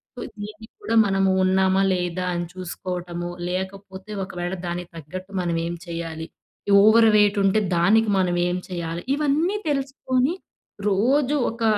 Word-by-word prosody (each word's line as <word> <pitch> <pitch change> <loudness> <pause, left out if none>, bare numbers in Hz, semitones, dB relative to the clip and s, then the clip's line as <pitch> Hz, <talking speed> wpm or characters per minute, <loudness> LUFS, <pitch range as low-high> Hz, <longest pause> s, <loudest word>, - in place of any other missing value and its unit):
So - - -9 0.2
దీన్ని 215 +1 -8
కూడా 230 - -1
మనము 195 -1 +2
ఉన్నామా? 190 +1 +3
లేదా? 180 0 -2
అని 175 0 -2
చూసుకోవటము 175 -1 -5 0.2
లేకపోతే 190 +2 -6
ఒకవేళ 175 -1 -4
దానికి 175 0 -4
తగ్గట్టు 185 +5 -8
మనం 170 -1 -1
ఏం 175 - -3
చేయాలి? 165 -1 -5 0.6
ఓవర్ 225 +2 +6
వెయిట్ 205 0 +4
ఉంటే 195 +2 +3 0.2
దానికి 215 +5 +4
మనం 180 -2 +1
ఏం 180 +1 -1
చేయాలి? 170 -2 -4
ఇవన్నీ 305 +7 +1
తెలుసుకొని 270 0 0 0.6
రోజు 260 +8 +2 0.2
ఒక 230 0 -6
190 Hz, 135 wpm, -23 LUFS, 175-220 Hz, 0.6 s, ఓవర్